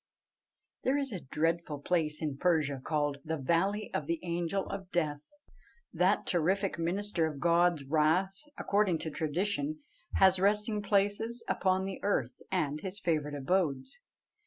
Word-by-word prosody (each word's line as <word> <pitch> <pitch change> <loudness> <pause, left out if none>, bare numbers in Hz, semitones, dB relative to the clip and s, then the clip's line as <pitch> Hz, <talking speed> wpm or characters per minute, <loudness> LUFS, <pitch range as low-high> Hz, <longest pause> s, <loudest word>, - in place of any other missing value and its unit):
There 265 +2 +2
is 275 -2 -1
a 190 - -4
dreadful 160 +2 -1
place 155 -1 0
in 145 -3 -2
Persia 150 -6 +1
called 145 -2 0
the 160 +1 -2
"Valley 180 +9 0
of 150 - -2
the 165 -1 -1
Angel 175 +2 -1
of 195 -2 -6
Death." 150 -4 0 0.7
That - - +2
terrific 185 +2 +1
minister 175 0 0
of 150 -3 -6
God's 170 -2 +3
wrath, 160 +7 +2 0.2
according 200 -4 +2
to 160 - -3
tradition, 200 - -2 0.3
has 190 -1 +5
resting 210 +2 +2
places 205 +4 0
upon 190 0 +1
the 195 -1 -5
earth 130 -11 -1
and 150 -6 0
his 190 +1 -5
favourite 150 -4 -1
abodes. 160 - 0
175 Hz, 140 wpm, -31 LUFS, 155-195 Hz, 0.7 s, has